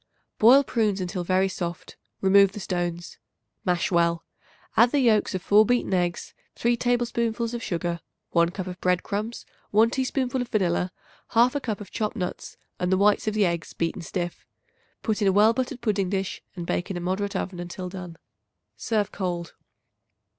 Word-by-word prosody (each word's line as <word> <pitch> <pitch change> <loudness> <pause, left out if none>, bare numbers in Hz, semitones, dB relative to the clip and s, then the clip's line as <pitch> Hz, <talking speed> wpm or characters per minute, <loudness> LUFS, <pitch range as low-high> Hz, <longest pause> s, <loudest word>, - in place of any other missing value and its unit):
Boil 255 +6 +7
prunes 215 -6 0
until 180 0 -3
very 185 +2 +2
soft; 175 -2 -5 0.3
remove 195 0 +5
the - - -6
stones. 175 -2 -3 0.5
Mash 180 0 +1
well; 170 -1 +2 0.5
add 235 +2 +6
the 290 - +1
yolks 220 -6 +3
of 185 - -3
4 210 +1 +6
beaten 240 -3 +1
eggs, 175 -1 -1 0.2
3 240 +1 +2
tablespoonfuls 235 -1 0
of 240 - -3
sugar, 170 -3 -2 0.3
1 170 0 +3
cup 185 +1 -5
of 180 -1 -8
bread 180 -1 +2
crumbs, 215 +3 -4 0.2
1 220 +3 +4
teaspoonful 260 -1 -1
of 245 - -3
vanilla, 180 -4 0 0.4
1/2 250 +5 +4
cup 215 -5 -3
of 205 - -10
chopped 215 +1 -2
nuts, 185 -4 -5 0.2
and 180 0 0
the 190 - +4
whites 205 +2 +3
of 215 - 0
the 210 -2 +4
eggs 170 -1 -2
beaten 170 +2 -2
stiff. 175 +1 -4 0.6
Put 220 -1 -1
in 200 - +3
a - - +5
well 210 +4 +5
buttered 255 +1 -3
pudding 205 -5 0
dish 195 -1 -2
and 175 -2 -5
bake 175 +3 -2
in 190 - -3
a - - -2
moderate 190 +3 -2
oven 185 -2 -3
until 175 +1 -6
done. 180 -2 -8 0.6
Serve 215 -3 -1
cold. 175 -3 -3
195 Hz, 175 wpm, -25 LUFS, 180-225 Hz, 0.6 s, Boil